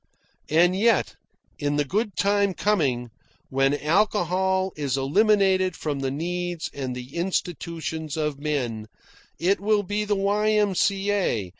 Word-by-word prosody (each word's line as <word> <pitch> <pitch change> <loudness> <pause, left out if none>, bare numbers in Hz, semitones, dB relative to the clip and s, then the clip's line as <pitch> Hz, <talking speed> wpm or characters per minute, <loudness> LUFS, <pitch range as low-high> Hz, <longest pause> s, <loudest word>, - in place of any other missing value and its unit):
And 175 +4 +4
yet, 225 +4 +2 0.4
in 145 0 0
the 145 0 +1
good 205 - -1
time 200 -1 +2
coming 135 - 0 0.4
when 135 +2 +1
alcohol 190 +1 +1
is 140 -3 -1
eliminated 190 +4 +3
from 145 -3 -3
the 135 -1 -1
needs 175 +3 -3
and 130 -3 -4
the 125 +1 -9
institutions 165 -3 -3
of 150 -2 -2
men, 125 -8 -2 0.5
it 190 +4 +1
will 210 0 +2
be 205 +2 -2
the 210 0 0
Y.M.C.A. 200 - +1
175 Hz, 125 wpm, -24 LUFS, 145-200 Hz, 0.5 s, And